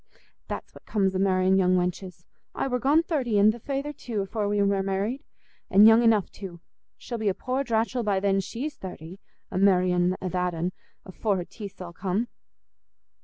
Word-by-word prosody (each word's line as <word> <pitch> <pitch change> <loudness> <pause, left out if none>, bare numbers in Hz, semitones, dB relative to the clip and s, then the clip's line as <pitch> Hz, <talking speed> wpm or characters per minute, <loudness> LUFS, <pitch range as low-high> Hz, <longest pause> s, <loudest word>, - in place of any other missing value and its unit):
That's - - -6
what - - -16
comes 195 -3 +1
o' - - 0
marr'in' 190 0 +3
young 185 -1 +3
wenches. 180 -1 -3 0.3
I - - -1
war 250 -1 -1
gone 295 +6 +3
thirty, 260 -10 0
an' 205 +2 +6
th' 230 +1 -10
feyther 280 +3 -3
too, 230 -7 -4
afore 205 +1 -2
we 205 0 +1
war 200 -1 +2
married; 195 +7 -2 0.5
an' 200 +2 +7
young 225 +1 +8
enough 225 -4 +3
too. 185 -4 -9 0.4
She'll 235 -2 -6
be 215 -2 +1
a 190 - -1
poor 255 +2 -2
dratchell 235 0 0
by 205 -4 +1
then 195 0 +2
she's 255 +10 -4
thirty, 180 0 -9 0.3
a 185 - -1
marr'in' 180 -2 +3
a 185 - -4
that'n, 180 -1 -1 0.3
afore 195 +2 -1
her 175 - -3
teeth's 200 -2 -10
all 175 -1 -7
come." 200 +7 -2
200 Hz, 185 wpm, -26 LUFS, 185-230 Hz, 0.5 s, young